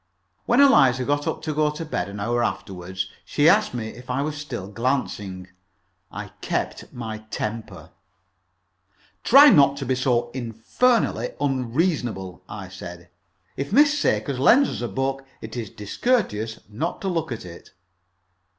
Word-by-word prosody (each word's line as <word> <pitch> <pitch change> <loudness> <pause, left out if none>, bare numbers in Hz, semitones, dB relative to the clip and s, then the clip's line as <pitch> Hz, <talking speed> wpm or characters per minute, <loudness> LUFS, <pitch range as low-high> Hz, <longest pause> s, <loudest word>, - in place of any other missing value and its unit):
When 240 +2 +4
Eliza 135 - +5
got 145 +1 0
up 155 - -3
to 155 - -2
go 150 0 +2
to 150 +2 -5
bed, 100 - -3
an 100 +1 -7
hour 120 +4 0
afterward, 95 -4 -5 0.3
she 145 +1 +2
asked 210 -4 +4
me 110 -2 -3
if 125 +3 -12
I 130 +3 0
was 150 0 -3
still 130 -10 -6
glancing. 100 -5 -2 0.6
I - - -7
kept - - -3
my 110 -3 -6
temper. 110 +1 -5 1.3
"Try 280 +4 +9
not 140 -2 +5
to 140 - -4
be 130 - +1
so 120 -2 0
infernally 125 - 0
unreasonable," 130 - -1
I 100 -3 -7
said. 90 -2 -10 0.5
"If 140 +4 -4
Miss 295 +5 +5
Sakers 140 - 0
lends 250 - +5
us - - -5
a 120 - -1
book, 135 +5 -2 0.2
it 110 +1 -8
is 115 -4 -4
discourteous 110 - -1
not 120 +12 -3
to 195 - -3
look 165 -7 -1
at 115 -5 -5
it." 85 -1 -11
125 Hz, 150 wpm, -24 LUFS, 110-150 Hz, 1.3 s, Try